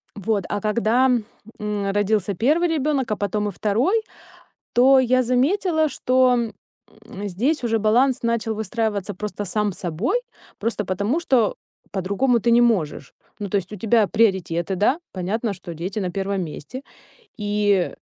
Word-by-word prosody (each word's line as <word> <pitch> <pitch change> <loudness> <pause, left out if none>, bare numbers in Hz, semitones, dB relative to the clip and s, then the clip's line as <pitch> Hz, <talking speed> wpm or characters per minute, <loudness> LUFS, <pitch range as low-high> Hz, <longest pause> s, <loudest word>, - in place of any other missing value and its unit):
Вот, 205 -1 -1
а 205 - -2
когда, 230 +4 +2 0.5
м, 210 -2 -2
родился 205 0 +1
1 305 - +2
ребёнок, 295 -6 0
а - - +2
потом 210 +1 -1
и - - -5
2, 235 - +1 0.7
то 265 +3 +6
я 255 0 +3
заметила, 315 - +2
что, 255 -2 +2 0.7
м, 205 0 -6
здесь 245 - -1
уже 225 -1 +1
баланс 245 +5 +2
начал 230 -1 0
выстраиваться 215 -2 -2
просто 210 +2 -5
сам 205 +2 -1
собой, 190 - -1 0.4
просто 220 -2 -2
потому 200 - -1
что 255 -10 +2 0.4
по-другому 200 +6 +1
ты 235 - +1
не 235 +1 +6
можешь. 175 - 0 0.2
Ну, 205 -2 -4
то 200 - 0
есть 195 0 -3
у - - -5
тебя 220 +2 +3
приоритеты, 190 -5 +1
да, 215 - +2
понятно, 200 +4 -2
что 175 -2 -9
дети 180 +6 -4
на 185 -3 -2
1 195 +1 -2
месте, 170 - -8 0.6
и 205 -3 +1
215 Hz, 150 wpm, -22 LUFS, 200-250 Hz, 0.7 s, то